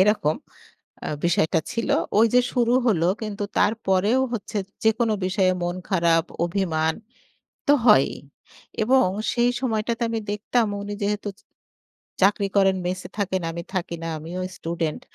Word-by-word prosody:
এরকম 190 -6 +3 0.7
আ - - -2 0.2
বিষয়টা 165 -2 +2
ছিল। 230 0 -2 0.3
ওই 225 - +7
যে, 250 - +7
শুরু 240 -1 +2
হল 195 -9 +2 0.2
কিন্তু 205 -1 -3
তারপরেও 210 +2 +2
হচ্ছে 215 -2 -3 0.3
যেকোন 220 +1 +3 0.2
বিষয়ে 185 0 +2
মন 175 +1 -2
খারাপ 170 -3 +3 0.2
অভিমান 160 -4 0 0.7
তো - - +7
হয়ই। 175 - +6 0.7
এবং 260 +3 +4 0.3
সেই 240 0 +3
সময়টাতে 230 -1 -1
আমি 225 - -1
দেখতাম 220 +2 0 0.2
উনি 205 0 -5
যেহেতু 205 0 -1
চ - - -21 0.8
চাকরি 200 +1 +3
করেন 195 -1 +4
মেসে 185 +1 -3
থাকেন, 190 -2 -1
আমি 170 - -5
থাকি 170 -2 -2
না, 165 - -3
আমিও 165 +4 -6 0.2
স্টুডেন্ট। 165 -2 -3
200 Hz, 140 wpm, -24 LUFS, 175-225 Hz, 0.8 s, ওই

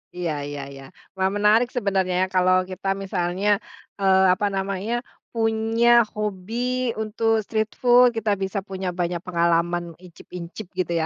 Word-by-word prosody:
Iya 175 -3 -2 0.2
iya 145 0 -6
iya. 135 0 -11 0.3
Wah, 190 0 +1
menarik 215 +4 +4
sebenernya, 195 -5 0
ya, - - 0
kalau 185 0 +4
kita 190 +1 -6 0.2
misalnya, 185 +1 -2 0.5
eee, 190 -1 +4
apa 205 +3 0
namanya, 195 +3 -2 0.4
punya 225 +1 +1 0.3
hobi 210 0 -4 0.5
untuk 220 0 0
street 220 -1 -1
food, 245 0 +6
kita 215 -1 0
bisa 190 +1 -2
punya 190 -1 -4
banyak 175 0 -1
pengalaman 170 0 +1 0.2
icip-icip 180 +2 -9
gitu 175 -2 -1
ya. - - 0
190 Hz, 140 wpm, -23 LUFS, 180-220 Hz, 0.5 s, food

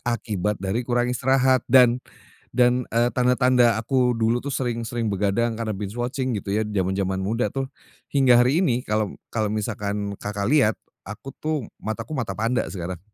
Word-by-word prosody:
Akibat 105 -4 -2
dari 95 +5 -2
kurang 120 0 0
istirahat 130 +1 +3
dan 125 -1 +6 0.5
dan, 125 0 +3
eee, 120 +1 +3
tanda-tanda 125 -2 +3
aku 125 +1 +2
dulu 115 0 +1
tuh 140 - -3
sering 120 -3 -2
sering 115 -1 -2
begadang 105 +3 0
karena 115 -2 -2
binge 100 +2 -6
watching 125 0 -2
gitu 100 -1 -4
ya, 105 - +1
zaman-zaman 95 -1 -1
muda 110 +6 -1
tuh 135 0 -3 0.5
hingga 130 -3 +5
hari 125 +8 +4
ini 125 -8 +1
kalau 105 -1 -1 0.2
kalau 110 -2 0
misalkan 105 -1 -3
Kakak 100 0 -3
lihat, 120 -8 +4 0.2
aku 105 +6 -9
tuh 155 -4 -1 0.2
mataku 110 +6 -5
mata 130 -7 -3
panda 115 +3 0
sekarang. 90 -2 -5
115 Hz, 165 wpm, -24 LUFS, 105-125 Hz, 0.5 s, dan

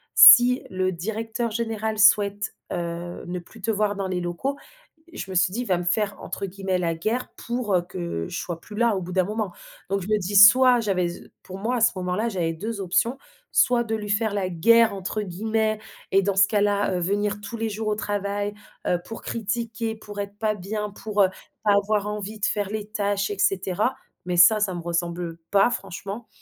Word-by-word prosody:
si 250 +1 +9
le 185 0 0
directeur 225 +6 -3
général 220 -1 -2
souhaite, 205 -1 +4 0.2
heu, 175 0 -5
ne 180 +1 -3
plus 210 +5 -15
te 225 - -3
voir 210 -1 0
dans 195 -1 -3
les 185 -1 -2
locaux, 175 +12 -3 0.6
je 195 - -6
me - - -5
suis 180 +1 +3
dit: 240 - -2
«Il - - -8
va 185 - +2
me - - -3
faire, 200 +3 0
entre - - -5
guillemets, 190 0 -2
"la 165 -2 -1
guerre" 220 +10 -2
pour, 240 -4 -2
heu, 175 - +3
que 85 - -5
je - - -5
sois 170 -2 -5
plus 210 - -11
là 235 -2 +3
au 190 - -2
bout 180 0 -7
d'un 185 -1 +2
moment», 210 -1 -3 0.4
donc 195 0 0
je 180 - -7
me 215 0 +2
dis 200 +2 -4
soit 250 +4 +8
j'avais 190 -4 0
s 170 - -7 0.2
pour 185 - -8
moi, 235 +5 -1
à 235 - -2
ce 235 - +5
moment-là, 185 +5 -1
j'avais 170 -5 -1
2 210 +5 -5
options, 210 +8 +1 0.3
soit 245 -2 +3
de 225 -1 -4
lui 210 -1 -5
faire 210 +1 +1
«la 195 -2 0
guerre», 225 +5 +4
entre 195 +3 -3
guillemets, 215 +3 -1 0.3
et 195 - +5
dans 200 0 0
ce 195 - +6
cas-là, 205 -2 +1
heu, 180 - 0
venir 205 +3 -1
tous 230 +3 -6
les 225 0 -1
jours 215 +1 -4
au 210 - +1
travail, 205 0 -2 0.3
heu, 175 0 +1
pour 225 - -8
critiquer, 225 +1 -3
pour 210 -1 -10
être 200 0 -8
pas 215 -1 0
bien 210 +2 -4
pour, 205 0 0
heu, 185 - +3 0.3
pas 205 -2 +4
avoir 205 0 +1
envie 210 +1 -5
de 210 - 0
faire 205 -2 -1
les 210 0 -4
tâches 205 -1 -1
et 200 - -5
cetera, 195 +4 +1 0.3
mais 180 -1 -2
ça, 215 +6 +7
ça 195 -3 +1
me 175 - -5
ressemble 170 0 -3
pas 200 +3 +5
franchement 200 +2 -6
205 Hz, 215 wpm, -24 LUFS, 185-220 Hz, 0.6 s, si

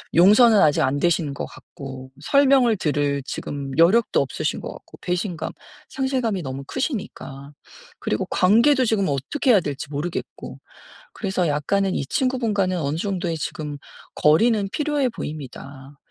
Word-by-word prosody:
용서는 210 +5 +7
아직 150 - +4
안 135 +2 +1
되신 165 -4 +1
것 - - -4
같고 130 -1 -10
설명을 265 - +4
들을 145 -4 0
지금 140 0 -5
여력도 190 +8 +4
없으신 135 - -3
것 - - -6
같고 - - -14
배신감 180 -1 -3 0.4
상실감이 255 -8 -1
너무 135 +1 -5
크시니까. 200 - -5 0.5
그리고 - - -2
관계도 240 +8 +4
지금 210 -4 +1
어떻게 145 - -2
해야 210 - +6
될지 145 -3 -5
모르겠고. 150 +5 -5 0.5
그래서 190 -4 -1
약간은 190 +7 0
이 140 - -1
친구분과는 215 - 0
어느 145 +1 -1
정도의 175 -2 -2
지금 150 -1 -5 0.4
거리는 200 +7 +3
필요해 295 -3 0
보입니다. 140 - -8
180 Hz, 330 characters per minute, -22 LUFS, 145-225 Hz, 0.5 s, 용서는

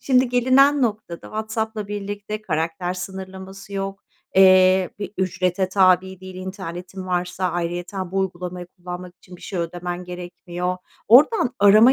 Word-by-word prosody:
Şimdi 255 -1 +3
gelinen 260 +3 +4
noktada 210 -7 -2
WhatsApp'la 220 -1 -3
birlikte 205 +1 -5
karakter 175 0 -2
sınırlaması 190 +1 -8
yok, 195 0 -4 0.3
eee, 185 -1 +6
bir 205 0 -5
ücrete 185 0 0
tabi 190 -1 +3
değil 185 0 -9
internetin 185 0 -7
varsa, 180 +1 -1
ayrıyeten 175 +2 -3
bu 195 - 0
uygulamayı 180 -1 -3
kullanmak 180 0 -9
için 180 0 -14
bir - - -18
şey 190 - -5
ödemen 175 +1 -4
gerekmiyor. 180 0 -5 0.3
Oradan 260 - +6
arama 215 +5 +7
185 Hz, 130 wpm, -22 LUFS, 180-205 Hz, 0.3 s, arama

